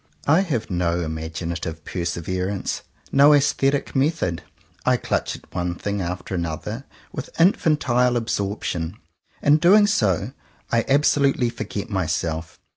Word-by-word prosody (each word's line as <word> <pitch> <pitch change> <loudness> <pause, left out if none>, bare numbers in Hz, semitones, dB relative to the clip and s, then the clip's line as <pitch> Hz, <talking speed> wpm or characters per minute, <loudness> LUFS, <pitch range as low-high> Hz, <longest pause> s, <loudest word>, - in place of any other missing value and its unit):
I 160 +5 +5
have 135 - -2
no 85 -1 0
imaginative 80 0 -4
perseverance, 90 +2 -3 0.3
no 145 +2 +7
aesthetic 140 -1 +1
method. 135 - 0 0.4
I - - +3
clutch - - -2
at - - -16
one 90 -1 -2
thing 100 +2 -3
after 90 +2 -4
another 85 -4 -4 0.3
with - - -5
infantile 145 -8 +3
absorption. 100 -5 -2 0.5
In 145 +1 +6
doing 200 +6 +6
so 105 - +1 0.4
I 115 -1 +2
absolutely 140 -3 +3
forget 110 -2 -5
myself. 80 -3 -2
100 Hz, 120 wpm, -23 LUFS, 85-140 Hz, 0.5 s, no